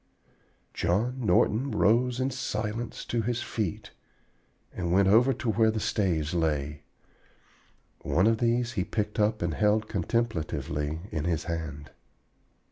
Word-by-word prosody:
John 120 +8 0
Norton 110 +6 +2
rose 120 +2 +2
in 130 +1 0
silence 115 -2 -4
to 120 - -1
his 120 +1 -2
feet 105 -9 -4 0.8
and 85 -2 -3
went 95 +2 +4
over 115 +7 +5
to 120 - -1
where 110 +1 +3
the 110 0 -1
staves 85 -8 0
lay. 75 -3 -1 1.2
One 90 - +1
of 110 0 +3
these 120 0 +1
he 100 -7 -1
picked 105 +2 -3
up 105 -2 +1
and 85 -2 0
held 105 +3 +2
contemplatively 80 -7 -2
in 75 -1 -2
his 85 -2 0
hand. 80 -5 -5
105 Hz, 130 wpm, -28 LUFS, 85-115 Hz, 1.2 s, over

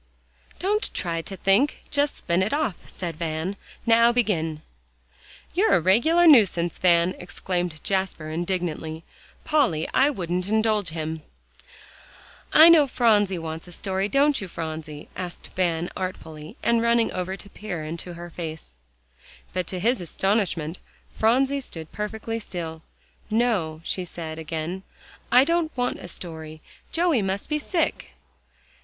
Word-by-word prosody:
"Don't 415 +4 0
try 165 -2 -1
to 195 +3 -6
think; 205 +11 +2
just 290 0 +1
spin 170 +1 0
it 195 +6 0
off," 290 - -2
said 170 -4 -5
Van. 160 +3 -2 0.3
"Now 230 0 +6
begin." 165 -10 0 0.9
"You're 400 +6 +4
a - - +4
regular 240 - +4
nuisance, 195 - +5
Van!" 175 0 +4
exclaimed 175 -2 -3
Jasper 190 -5 -1
indignantly. 165 -2 -3 0.4
"Polly, 250 - +2
I 275 +2 +5
wouldn't 180 - -2
indulge 215 -2 +2
him." 160 0 -4 1.3
"I 315 - +9
know 320 -4 +7
Phronsie 210 -7 +3
wants 160 0 -6
a - - -11
story; 190 +2 -2
don't 280 0 +3
you, 190 - -5
Phronsie?" 155 -3 -6
asked 180 -2 -7
Van 175 -2 +1
artfully, 160 -4 -6
and 235 -1 +3
running 235 0 +3
over 185 +1 -3
to 200 - -11
peer 180 -7 -5
into 170 +3 -6
her 175 0 -8
face. 160 - -7 0.8
But 185 -2 -2
to 185 - -4
his 235 +3 +1
astonishment, 180 -3 -1 0.3
Phronsie 265 +5 +2
stood 160 - -9
perfectly 220 +2 -4
still. 165 -6 -6 0.5
"No," 210 -9 +1
she 185 - -2
said 160 -2 -7
again, 160 +3 -4 0.5
"I 250 +1 +8
don't 330 -1 0
want 245 0 0
a - - -8
story; 160 -3 -7 0.3
Joey 330 -8 +2
must 195 +4 -2
be 300 0 0
sick." 330 +2 -1
185 Hz, 135 wpm, -25 LUFS, 165-235 Hz, 1.3 s, I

